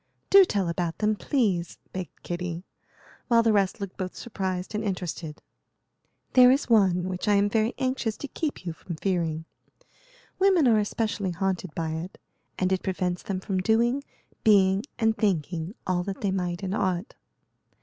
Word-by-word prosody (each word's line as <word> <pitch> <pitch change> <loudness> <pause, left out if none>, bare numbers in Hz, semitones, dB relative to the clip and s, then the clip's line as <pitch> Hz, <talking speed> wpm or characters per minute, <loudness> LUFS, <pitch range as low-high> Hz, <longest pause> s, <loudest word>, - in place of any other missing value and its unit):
"Do 390 -1 +9
tell 200 - 0
about 170 0 -2
them, 215 0 +1
please," 200 - 0 0.2
begged 185 -2 -7
Kitty, 175 0 -4 0.6
while 230 -2 +5
the 225 -1 +3
rest 200 +1 +1
looked 200 -2 -6
both 185 -1 -4
surprised 190 -4 -4
and 215 +1 -2
interested. 180 -5 -4 0.9
"There 250 -1 +8
is 270 +3 +2
one 185 -5 +4
which 185 +2 -4
I 205 - +5
am 200 0 +4
very 220 +3 +1
anxious 255 -4 -1
to 285 - -6
keep 290 - -4
you 170 - -3
from 170 +1 -7
fearing. 165 -3 -1 0.9
Women 375 -7 +5
are 225 -3 +5
especially 210 -2 -1
haunted 185 -1 -2
by 165 -1 -2
it, 165 +4 -5 0.4
and 185 0 0
it 185 - 0
prevents 180 -1 -2
them 190 -2 -4
from 190 -1 -1
doing, 235 +7 +2 0.4
being, 195 -2 +4
and 225 -1 +2
thinking 175 -2 -1
all 180 -1 +1
that 195 -1 -5
they 200 - +1
might 180 -1 -2
and 190 0 -2
ought. 185 -1 -1
190 Hz, 165 wpm, -26 LUFS, 180-220 Hz, 0.9 s, Do